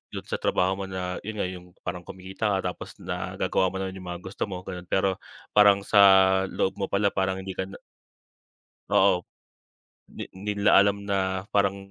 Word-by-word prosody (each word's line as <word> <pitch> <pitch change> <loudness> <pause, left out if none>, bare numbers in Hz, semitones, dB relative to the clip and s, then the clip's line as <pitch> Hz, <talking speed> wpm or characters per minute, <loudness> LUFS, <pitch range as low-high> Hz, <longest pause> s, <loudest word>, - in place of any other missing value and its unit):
dun - - -5
sa - - -4
trabaho 95 +1 +1
mo 100 - -3
na 90 -1 -4
'yun 110 - -4
nga - - -1
'yung 90 -1 -10 0.2
parang 90 0 -4
kumikita 95 +3 -3
ka 90 - -1
tapos - - -11
nagagawa 95 0 -1
mo 95 - -5
naman 95 0 -5
'yung 90 - -10
mga 85 - -10
gusto 95 +3 -4
mo, 90 -2 -6
gano'n. 90 -1 -8
Pero 95 0 +1 0.3
parang 100 -1 +5
sa 100 - +3 0.5
loob 95 - -1
mo 95 - -1
pala 100 0 +1
parang 95 0 0
hindi 95 - -5
ka 95 0 -4
na 95 - -11 1.2
Oo, 95 -2 +4 0.9
di - - -7
di 100 +2 -5
nila 100 - +5
alam 100 0 +5
na 95 0 -1
parang, 100 -1 +3
95 Hz, 185 wpm, -26 LUFS, 95-100 Hz, 1.2 s, parang